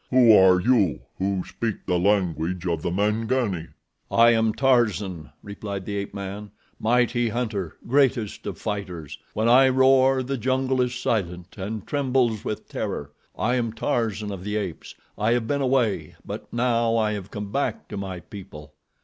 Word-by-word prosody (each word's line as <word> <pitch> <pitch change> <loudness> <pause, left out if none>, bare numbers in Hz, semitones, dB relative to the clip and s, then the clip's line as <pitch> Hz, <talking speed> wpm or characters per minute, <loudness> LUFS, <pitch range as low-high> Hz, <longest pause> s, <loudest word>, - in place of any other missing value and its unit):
"Who 125 -4 +7
are 95 -1 +6
you 100 -4 +2 0.2
who 95 -1 0
speak 115 -3 -4
the 90 -2 +1
language 90 -2 0
of 85 -3 -1
the 90 - -1
Mangani?" 105 -1 0 0.4
"I 115 0 +6
am 110 -1 +3
Tarzan," 105 - +1
replied 100 -1 -6
the 100 - -4
ape 100 0 -3
man; 100 +1 -6 0.3
"mighty 120 +1 +2
hunter, 110 -7 -3
greatest 130 -4 +1
of 95 -4 -4
fighters. 95 -8 -5 0.2
When 110 +2 +1
I 130 +3 +6
roar, 130 0 +4
the 135 0 -3
jungle 130 +1 +1
is 125 0 0
silent 90 -7 -2
and 105 +1 -5
trembles 130 -6 +1
with 105 - -4
terror. 75 0 -4 0.3
I 120 - +1
am 115 -3 -1
Tarzan 110 -2 -1
of 95 -2 -6
the 105 +1 -3
Apes. 100 -6 -4 0.2
I 110 +3 +3
have 120 -2 0
been 140 +5 -1
away; 125 -5 0
but - - -7
now 115 -1 +1
I 110 -1 +2
have 100 -2 -5
come 105 -1 -6
back 140 +5 -2
to - - -6
my 95 -3 -5
people." 75 -7 -11
110 Hz, 165 wpm, -24 LUFS, 95-120 Hz, 0.4 s, Who